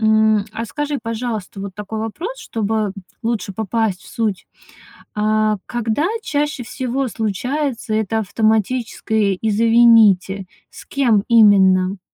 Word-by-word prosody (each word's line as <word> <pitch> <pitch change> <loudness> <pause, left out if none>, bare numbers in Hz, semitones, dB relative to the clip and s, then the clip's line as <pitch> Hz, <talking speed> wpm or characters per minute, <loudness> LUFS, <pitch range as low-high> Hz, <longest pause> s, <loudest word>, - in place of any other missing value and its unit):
М, 220 -1 +3
а 230 - -4
скажи, 295 +3 -3
пожалуйста, 225 -4 -4
вот 195 -2 -6
такой 210 +1 -6
вопрос, 345 - -5
чтобы 215 -2 -2 0.3
лучше 225 -4 -2
попасть 220 -2 -1
в - - -15
суть. 215 -6 -2 0.7
А, 215 0 +1
когда 240 +5 -1 0.2
чаще 295 -4 -2
всего 260 +3 -3
случается 235 +3 -2
это 220 0 0
автоматическое 220 -1 0
"извините", 220 -3 +4 0.3
с - - -13
кем 235 -8 +2
именно? 195 -4 +5
220 Hz, 115 wpm, -19 LUFS, 205-235 Hz, 0.7 s, именно